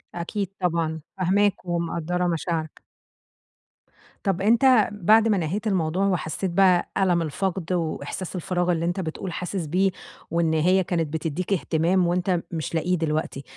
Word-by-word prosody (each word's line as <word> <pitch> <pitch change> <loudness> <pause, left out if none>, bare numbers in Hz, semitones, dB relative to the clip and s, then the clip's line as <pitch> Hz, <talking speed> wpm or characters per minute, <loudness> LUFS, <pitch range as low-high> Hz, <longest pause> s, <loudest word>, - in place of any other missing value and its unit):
أكيد 190 +3 -3
طبعًا 165 -3 0 0.2
فاهماك 190 +1 +1
ومقدَّرة 175 +1 -1
مشاعرك. 165 -1 -3 1.4
طَب 195 -1 0
أنت 235 +1 +5
بعد 215 +3 +4
ما 210 -3 +3
نهيت 190 +7 -2
الموضوع 185 0 +1
وحسّيت 175 0 -1
بقى 180 -1 +4
ألَم 180 -3 +2
الفقد 180 +2 -2
وإحساس 175 +2 -3
الفراغ 180 0 0
اللي 170 0 0
أنت 175 +2 -1
بتقول 175 +2 -4
حاسس 180 -1 -3
بيه، 185 +5 +2 0.4
وإن 165 -1 +1
هي 180 +4 +3
كانت 165 -4 -2
بتدّيك 165 +5 -2
إهتمام 175 +1 +1
وأنت 180 0 +1
مش 165 0 -4
لاقيه 175 +3 +1
دلوقتي، 155 -3 -2
175 Hz, 135 wpm, -24 LUFS, 165-190 Hz, 1.4 s, أنت